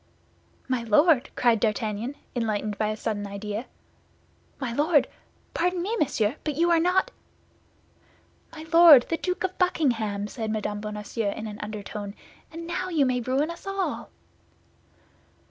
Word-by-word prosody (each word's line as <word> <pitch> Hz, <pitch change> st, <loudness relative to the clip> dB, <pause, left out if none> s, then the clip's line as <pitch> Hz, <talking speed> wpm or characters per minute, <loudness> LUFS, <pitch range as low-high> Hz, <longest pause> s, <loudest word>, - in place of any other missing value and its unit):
"My 255 Hz, -2 st, 0 dB
Lord!" 265 Hz, +5 st, +4 dB
cried 235 Hz, -3 st, +3 dB
D'Artagnan, 220 Hz, +3 st, -1 dB, 0.2 s
enlightened 215 Hz, -3 st, -1 dB
by 215 Hz, -, +1 dB
a 215 Hz, 0 st, -2 dB
sudden 205 Hz, -2 st, -3 dB
idea, 210 Hz, +3 st, -5 dB, 0.9 s
"my 255 Hz, -4 st, -3 dB
Lord! 295 Hz, +3 st, +3 dB, 0.5 s
Pardon 360 Hz, +1 st, 0 dB
me, 430 Hz, +5 st, -1 dB
monsieur, 260 Hz, -, 0 dB
but 300 Hz, -2 st, -2 dB
you 340 Hz, +3 st, +2 dB
are 335 Hz, -, +5 dB
not—" 360 Hz, +3 st, +2 dB, 1.4 s
"My 315 Hz, 0 st, -9 dB
Lord 330 Hz, -7 st, +9 dB
the 330 Hz, -, 0 dB
Duke 365 Hz, +2 st, -2 dB
of 370 Hz, 0 st, -3 dB
Buckingham," 235 Hz, -, +1 dB
said 220 Hz, 0 st, -5 dB
Mme. 210 Hz, -1 st, -2 dB
Bonacieux, 210 Hz, 0 st, -3 dB
in 220 Hz, -, -6 dB
an 210 Hz, 0 st, -7 dB
undertone; 210 Hz, -1 st, -6 dB, 0.4 s
"and 330 Hz, +1 st, -7 dB
now 365 Hz, +2 st, -3 dB
you 310 Hz, -6 st, +2 dB
may 250 Hz, -1 st, 0 dB
ruin 270 Hz, +6 st, 0 dB
us 340 Hz, +3 st, -11 dB
all." 390 Hz, -1 st, -3 dB
245 Hz, 145 wpm, -26 LUFS, 215-330 Hz, 1.4 s, Lord